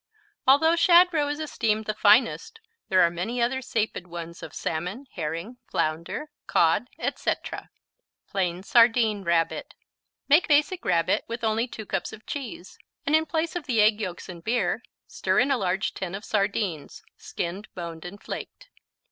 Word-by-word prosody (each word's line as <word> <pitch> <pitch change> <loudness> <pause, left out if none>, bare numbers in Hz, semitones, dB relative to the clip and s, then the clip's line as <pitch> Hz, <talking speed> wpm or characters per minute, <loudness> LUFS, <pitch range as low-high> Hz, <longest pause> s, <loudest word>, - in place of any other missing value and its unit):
Although 320 +5 +6
shad 350 +1 +7
roe 295 -2 +2
is 290 +1 -3
esteemed 220 -8 -1
the 215 - -1
finest, 235 - +3 0.3
there 185 -1 +5
are 170 - +3
many 200 +9 -3
other 250 +3 +1
sapid 220 -7 -2
ones 170 -1 -8
of 155 - -8
salmon, 180 - -4
herring, 170 +8 -4
flounder, 170 - -2 0.2
cod, - - +3
etc. - - -3 0.6
Plain 180 -2 -2
Sardine 225 -2 +4
Rabbit 170 -1 0 0.5
Make 300 +5 +5
Basic 305 +4 +2
Rabbit 165 -2 +2
with 230 +1 -5
only 225 +2 +1
2 220 -3 -8
cups - - -3
of 220 - -12
cheese, 240 -10 -7 0.3
and 290 - +3
in 315 0 +2
place 325 0 -1
of 345 -4 -4
the 240 -4 +1
egg 215 +1 +4
yolks 180 -4 -5
and 170 -2 -9
beer, 240 +5 0 0.2
stir - - -1
in 265 +3 +4
a 270 - +3
large 190 +2 0
tin 190 -1 -5
of 205 - -7
sardines, 200 -6 -2
skinned, 185 +5 -5
boned 170 -2 -6
and 185 +3 -9
flaked. - - -7
215 Hz, 160 wpm, -26 LUFS, 180-270 Hz, 0.6 s, shad